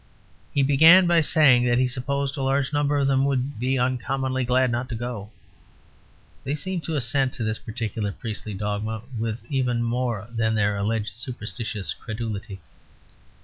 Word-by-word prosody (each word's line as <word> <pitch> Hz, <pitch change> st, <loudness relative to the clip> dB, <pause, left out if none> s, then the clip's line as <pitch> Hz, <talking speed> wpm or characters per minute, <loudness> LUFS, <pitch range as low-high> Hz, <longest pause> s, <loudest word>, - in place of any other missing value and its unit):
He 140 Hz, -, +2 dB
began 160 Hz, +7 st, +7 dB
by 170 Hz, -1 st, +5 dB
saying 140 Hz, -6 st, +5 dB
that 120 Hz, 0 st, +3 dB
he 130 Hz, -, +3 dB
supposed 140 Hz, +2 st, -2 dB
a 140 Hz, -, -4 dB
large 135 Hz, +2 st, 0 dB
number 145 Hz, 0 st, +1 dB
of 140 Hz, -, +2 dB
them 135 Hz, -1 st, +2 dB
would 135 Hz, -2 st, -1 dB
be 130 Hz, +2 st, 0 dB
uncommonly 130 Hz, +1 st, -1 dB
glad 125 Hz, 0 st, +2 dB
not 120 Hz, +2 st, -2 dB
to 120 Hz, -, -4 dB
go. 115 Hz, -3 st, -5 dB, 1.1 s
They 140 Hz, +1 st, -2 dB
seemed 180 Hz, +2 st, -3 dB
to 160 Hz, -, -2 dB
assent 135 Hz, 0 st, +1 dB
to 115 Hz, -, -4 dB
this 110 Hz, 0 st, -2 dB
particular 110 Hz, -3 st, -4 dB
priestly 105 Hz, 0 st, -6 dB
dogma 105 Hz, +2 st, -3 dB, 0.2 s
with 115 Hz, +1 st, -3 dB
even 125 Hz, -4 st, 0 dB
more 120 Hz, -3 st, -2 dB
than 110 Hz, -1 st, 0 dB
their 105 Hz, -1 st, +1 dB
alleged 105 Hz, -1 st, -2 dB
superstitious 110 Hz, -5 st, -5 dB
credulity. 110 Hz, -3 st, -6 dB
125 Hz, 160 wpm, -24 LUFS, 110-135 Hz, 1.1 s, began